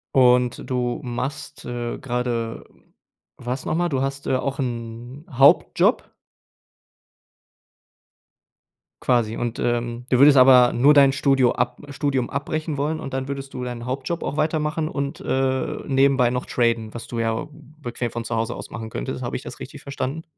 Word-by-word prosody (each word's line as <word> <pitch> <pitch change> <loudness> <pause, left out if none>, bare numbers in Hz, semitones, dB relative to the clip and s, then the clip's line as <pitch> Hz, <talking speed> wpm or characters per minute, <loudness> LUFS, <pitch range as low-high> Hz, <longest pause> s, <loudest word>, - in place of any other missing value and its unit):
Und 125 -2 +4
du 125 -1 -1
machst, 125 +4 -5
äh, 120 -1 -4
grade, 120 -2 -2 0.7
was 125 +2 -4
noch - - -1
mal? 175 +1 +1
Du 135 -4 -1
hast, 135 +1 -3
äh, - - +2
auch 135 +2 -2
'n 120 +2 -5
Hauptjob? 135 +2 +4 2.9
Quasi 115 -3 +1
und, 120 -1 -3
ähm, 120 0 -1
du 125 - +3
würdest 140 +1 +7
aber 125 -1 +7
nur 135 +5 +5
dein 140 -2 +6
Studio 135 -2 +3
ab - - -2
Studium 135 -3 -1
abbrechen 155 +2 -3
wollen 150 +3 -1
und 135 - -7
dann 130 0 -2
würdest 135 -1 -6
du 125 - -5
deinen 120 -1 -5
Hauptjob 135 +6 -3
auch 145 - -3
weitermachen 155 0 0
und, 140 -2 -4
äh, 130 0 0
nebenbei 135 -2 +3
noch 125 0 -3
traden, 115 -2 0
was 115 - -6
du 120 - -5
ja 115 +2 -1
bequem 145 -5 -6
von 120 0 -5
zu 120 - -2
Hause 115 0 -1
aus - - -9
machen 110 -2 -6
könntest. - - -5
Habe - - -4
ich - - -4
das - - -9
richtig - - -9
verstanden? 140 +3 -4
130 Hz, 160 wpm, -23 LUFS, 120-140 Hz, 2.9 s, würdest